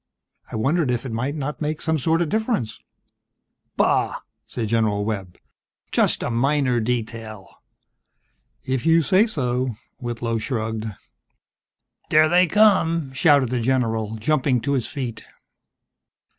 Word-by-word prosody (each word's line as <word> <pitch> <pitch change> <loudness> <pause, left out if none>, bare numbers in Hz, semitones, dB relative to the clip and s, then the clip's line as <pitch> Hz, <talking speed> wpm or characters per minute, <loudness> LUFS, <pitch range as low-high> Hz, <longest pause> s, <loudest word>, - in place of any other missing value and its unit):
I - - -5
wondered 140 +6 +1
if 125 +1 -1
it 130 - -5
might 130 +6 -2
not 150 +1 -4
make 155 0 -2
some 160 -1 -1
sort 165 +5 +2
of 160 - -4
difference?" 220 - -1 1.0
"Bah!" - - +2 0.3
said 115 -3 -4
General 105 -3 +1
Webb. 95 -5 -4 0.5
"Just - - +2
a - - -2
minor 130 +1 +1
detail." 110 -3 -4 1.2
"If 130 -2 -1
you 165 0 +4
say 195 +9 +4
so," 125 - -1 0.2
Whitlow 115 -1 -3
shrugged. 110 -2 -3 1.2
"There 155 +1 +5
they 175 +2 +4
come!" 165 -7 +3
shouted 140 -3 +3
the 125 - 0
general, 115 -3 0
jumping 130 +2 +1
to 140 - -2
his 125 -5 0
feet. 130 -6 -5
130 Hz, 130 wpm, -22 LUFS, 115-155 Hz, 1.2 s, There